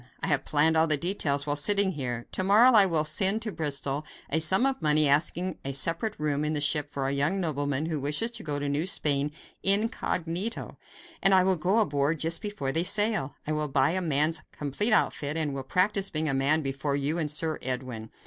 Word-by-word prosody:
I - - -4
have 145 -3 0
planned 155 +2 +2
all 160 +1 +3
the 155 -1 +3
details 145 -5 0
while 145 -1 -1
sitting 200 +6 +4
here. 125 -7 -5
To 185 - -2
morrow 215 +7 +5
I 210 -5 +7
will 160 -4 0
send 190 +7 +2
to 220 - -4
Bristol 145 -3 -3 0.3
a 160 - +4
sum 190 +9 +3
of 270 -1 0
money 150 0 +3
asking 170 +5 0
a 135 - -4
separate 165 +10 -1
room 150 -1 -1
in 150 +1 -1
the 150 - -1
ship 145 0 0
for 140 -2 -4
a 135 - -1
young 150 +8 0
nobleman 145 -4 -2
who 160 -2 -3
wishes 150 - -1
to 235 - -4
go 145 -3 -3
to 145 0 -3
New 145 +5 -1
Spain 145 -5 +1 0.3
incognito, 195 -1 -1 0.4
and 195 0 +5
will 190 0 +2
go 180 +6 0
aboard 150 -7 +1
just 165 +2 -1
before 205 -11 -4
they 160 - 0
sail. 205 -6 +1
I 155 - -3
will 150 0 -1
buy 135 +1 +1
a 185 +2 -1
man's 155 -1 0
complete 150 - -1
outfit, 150 -7 0
and 150 -3 -1
will 135 - -4
practice 195 - 0
being 155 0 -2
a 140 - 0
man 145 +4 +1
before 140 +1 -2
you 145 +4 -1
and 155 -2 -1
Sir 155 +1 -1
Edwin." 125 -4 -5
155 Hz, 215 wpm, -27 LUFS, 145-185 Hz, 0.4 s, I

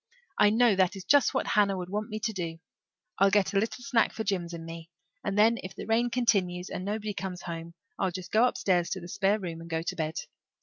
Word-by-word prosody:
"I 205 - +7
know 225 0 +4
that 185 0 +3
is 190 - -7
just 285 +6 +4
what - - +1
Hannah 200 -2 +2
would 180 0 -6
want 210 +1 -2
me 215 - -4
to 220 +1 -1
do. 170 -4 -4 0.6
I'll 195 +1 +6
get 205 -1 +2
a 195 - +4
little 225 +4 -3
snack 240 -3 +2
for 220 - -3
Jims 185 -5 -1
and 165 -1 -7
me, 165 0 -8 0.3
and 195 - -2
then 225 +2 +5
if 185 - -8
the - - -6
rain 230 +2 +2
continues 195 -7 +1
and 185 - -4
nobody 210 +1 -3
comes 190 -2 -5
home 170 -1 -6 0.2
I'll 190 - +2
just 185 0 -7
go 225 +3 +5
upstairs 180 -7 +1
to 190 - -3
the 175 - -9
spare 195 +3 +1
room 170 -5 -6
and 165 - -10
go 165 0 -1
to - - -3
bed. 160 -1 -2
195 Hz, 245 wpm, -28 LUFS, 175-215 Hz, 0.6 s, I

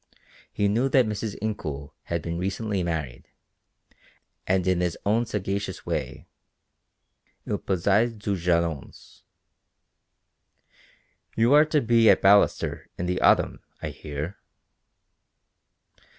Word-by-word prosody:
He 100 - 0
knew 120 +7 +1
that 130 -2 +4
Mrs. 105 0 -4
Incoul 75 -10 -4
had 85 -3 -3
been 85 0 -3
recently 95 +2 -2
married, 80 -8 -4 1.2
and 95 -1 +1
in 95 -1 +1
his 90 -2 -1
own 110 +3 +2
sagacious 100 -2 -3
way, - - -4 1.2
il - - -2
posait 100 +5 +1
des 105 -1 -2
jalons. 85 -4 -2 2.1
"You 115 +4 +3
are 150 +1 +7
to 155 -1 +1
be 115 -1 +4
at - - +6
Ballaster 100 +1 +3
in 90 - -3
the 90 +1 -1
autumn, - - +3 0.2
I - - -4
hear." 75 +6 -6
95 Hz, 110 wpm, -25 LUFS, 85-110 Hz, 2.1 s, are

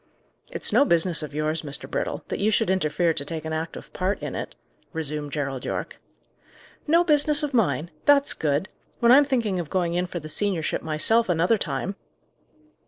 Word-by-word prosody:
"It's - - 0
no - - +6
business 170 -6 +2
of 150 - -6
yours, 155 +2 -1
Mr. 145 -2 -2
Brittle, - - -3
that - - -3
you 205 - +2
should 195 -3 +1
interfere 170 -2 +1
to 140 - -2
take 160 +1 -6
an 160 - -3
active 160 +1 -6
part 190 +2 -1
in - - -5
it," - - -6 0.4
resumed 150 -2 -4
Gerald 135 -3 -3
Yorke. - - -4 0.9
"No 335 +3 +5
business 300 -2 +4
of 290 -2 -2
mine! 170 - +1
That's 285 -1 +4
good! 150 +4 -1 0.3
When 235 -1 +5
I'm 285 +3 +7
thinking 230 -9 0
of 165 -4 -5
going 175 -2 0
in 180 +1 0
for 175 - -5
the 155 - -9
seniorship 180 0 -1
myself 175 +9 +2
another 175 +6 +2
time!" 195 - -3
175 Hz, 180 wpm, -24 LUFS, 155-225 Hz, 0.9 s, I'm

